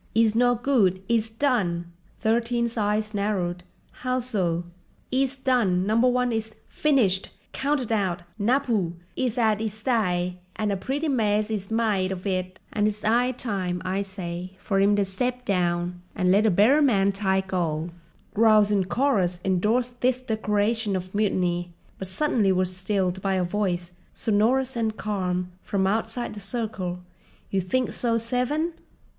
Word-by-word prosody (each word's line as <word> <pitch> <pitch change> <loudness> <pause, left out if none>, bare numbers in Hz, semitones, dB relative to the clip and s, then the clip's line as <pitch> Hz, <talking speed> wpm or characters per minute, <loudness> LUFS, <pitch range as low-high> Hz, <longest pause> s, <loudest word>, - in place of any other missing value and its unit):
"'E's 225 -1 +4
no 245 +1 +4
good, 225 -7 +2
'e's 225 -1 +1
done." 220 -9 0 0.4
Thirteen's 235 +1 +1
eyes 215 0 0
narrowed. 190 -4 -1 0.4
"How 255 0 0
so?" 185 -9 -1 0.5
"'E's 270 +1 +1
done, 230 -9 +2
Number 225 +4 +3
One 250 0 +2
is—finished, 220 -1 0 0.2
counted 275 -4 -1
out, 190 -5 0 0.2
napoo! 225 -6 +1 0.2
'E's 255 -2 -1
'ad 220 -3 +2
'is 215 -1 -4
d'y, 180 -7 0 0.2
and 210 -1 -1
a - - +1
pretty 275 +10 -2
mess 215 -5 +1
'e's 200 -3 -3
mide 215 -5 +1
of 185 0 -5
it—and 185 +2 -2
it's 210 0 -3
'igh 245 +4 +2
time, 190 -7 -2
I 190 +2 0
say, 185 -2 -6
for 195 0 -1
'im 200 +1 +4
to 200 -1 +2
step 250 +6 -2
down 175 -2 0
and 180 -2 +2
let 205 +3 +4
a - - +5
better 215 - +5
man 200 -8 +4
tike 190 -1 -1
'old." 165 -2 -1 0.4
Growls 215 -1 +5
in 195 -2 +2
chorus 185 -4 +1
endorsed 230 +7 +1
this 255 0 +2
declaration 220 -2 0
of 185 0 -5
mutiny; 180 -4 0 0.3
but 190 - -5
suddenly 210 -1 +1
were 185 0 +2
stilled 185 0 -1
by 195 0 0
a 185 - +1
voice, 180 -2 -1 0.2
sonorous 240 +5 +2
and 220 -2 -1
calm, 180 -3 -2
from 195 -1 0
outside 225 +4 -1
the 210 - -8
circle: 195 -4 -3 0.5
"You 195 - +1
think 250 +8 0
so, 230 -2 +1
Seven? 250 +8 -1
210 Hz, 150 wpm, -25 LUFS, 185-235 Hz, 0.5 s, a